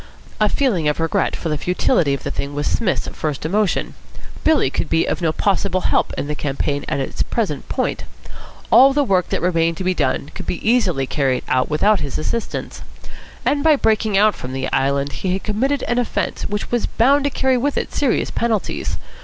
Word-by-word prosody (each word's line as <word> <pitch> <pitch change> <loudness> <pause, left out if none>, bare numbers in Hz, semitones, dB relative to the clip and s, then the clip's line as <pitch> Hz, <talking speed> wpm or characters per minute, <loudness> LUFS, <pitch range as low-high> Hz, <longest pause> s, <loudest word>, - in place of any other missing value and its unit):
A 215 -1 +3
feeling 200 - +1
of 150 - 0
regret 165 -1 0
for 165 - -4
the 150 -1 -1
futility 170 -4 +1
of - - -9
the - - -3
thing 140 +1 -4
was 145 - -2
Psmith's 215 -6 0
first 150 -2 -4
emotion. 205 +3 0 0.5
Billy 315 -2 +3
could - - -2
be 165 0 +2
of - - -2
no 165 -2 +2
possible 195 +1 0
help - - +1
in - - -2
the 150 - -3
campaign 145 0 -2
at - - -1
its 135 - -3
present 195 -12 -2
point. - - -2 0.7
All 270 +1 +7
the 290 +1 +2
work 190 -8 +1
that - - -2
remained 165 -2 +1
to - - -4
be 185 0 +1
done 140 -2 -1
could - - -6
easily 185 - +1
be - - -3
carried 135 -3 0
through 130 0 +1
without 200 +7 +3
his 140 -2 -3
assistance. 230 +9 -4 0.6
And 285 -1 +1
by 315 -1 +6
breaking 220 -5 +1
out 210 +1 +5
from 125 +1 -7
the 130 0 -3
Island 140 +1 +1
he 180 +7 -2
had 190 - -3
committed 260 +6 0
an 240 0 0
offence 245 - -2
which 205 +1 -4
was 240 -1 +1
bound 275 +5 +3
to - - +3
carry 265 -1 +1
with 280 +4 -1
it - - -2
serious 275 -5 0
penalties. 225 -4 -1
185 Hz, 205 wpm, -20 LUFS, 150-235 Hz, 0.7 s, All